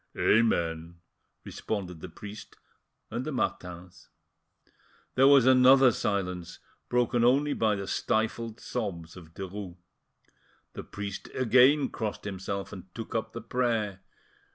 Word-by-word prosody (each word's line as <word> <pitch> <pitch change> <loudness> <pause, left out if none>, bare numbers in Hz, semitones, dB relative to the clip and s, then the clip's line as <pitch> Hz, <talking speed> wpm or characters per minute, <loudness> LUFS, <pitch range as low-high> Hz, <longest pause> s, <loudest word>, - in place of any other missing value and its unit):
"Amen," 85 -7 +1 0.5
responded 90 -6 -5
the - - -8
priest 105 0 -10 0.6
and - - -3
the - - -4
Martins. 90 0 -4 1.0
There 135 +1 +5
was 140 -3 +7
another 130 0 +7
silence, 90 -5 -3 0.3
broken 120 -1 +2
only 140 +4 +3
by 110 -2 +1
the 100 0 -4
stifled 110 +3 -1
sobs 85 -8 -5
of 80 -3 -14
Derues. 95 -1 -7 1.0
The - - -7
priest 100 -1 -7
again 130 +4 +4
crossed 110 -2 -4
himself 100 0 -5
and 95 -2 -9
took 115 -1 -7
up 110 -1 -2
the 115 - -6
prayer. 115 -6 -1
105 Hz, 120 wpm, -28 LUFS, 95-120 Hz, 1.0 s, was